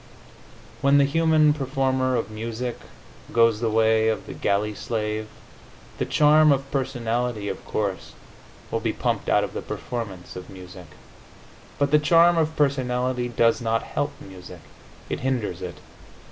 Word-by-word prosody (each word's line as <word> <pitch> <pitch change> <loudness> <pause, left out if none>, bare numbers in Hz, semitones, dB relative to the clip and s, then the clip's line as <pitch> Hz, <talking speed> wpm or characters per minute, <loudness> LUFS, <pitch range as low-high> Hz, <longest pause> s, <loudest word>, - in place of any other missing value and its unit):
When 140 +1 +4
the 140 - +5
human 155 0 +3
performer 130 -2 0
of 115 -2 -2
music 115 +3 -4 0.5
goes 115 -2 +3
the 115 -1 0
way 110 0 +3
of 110 -2 -1
the - - -8
galley 105 +2 0
slave, 110 0 -3 0.7
the - - -1
charm 150 0 +5
of 135 0 -1
personality, 120 -5 -2
of - - -6
course, 100 -4 -3 0.6
will - - 0
be - - -1
pumped - - -2
out - - +3
of - - -5
the - - -4
performance 100 -7 -6
of 90 - -9
music. 90 -2 -11 0.9
But 140 -1 +1
the 150 - +6
charm 170 +3 +5
of 160 0 0
personality 125 -3 0
does 115 0 +2
not 115 -1 0
help 145 0 -2
music; 90 -2 -11 0.5
it - - -3
hinders 120 -9 -2
it. 90 -1 -6
120 Hz, 145 wpm, -24 LUFS, 110-140 Hz, 0.9 s, the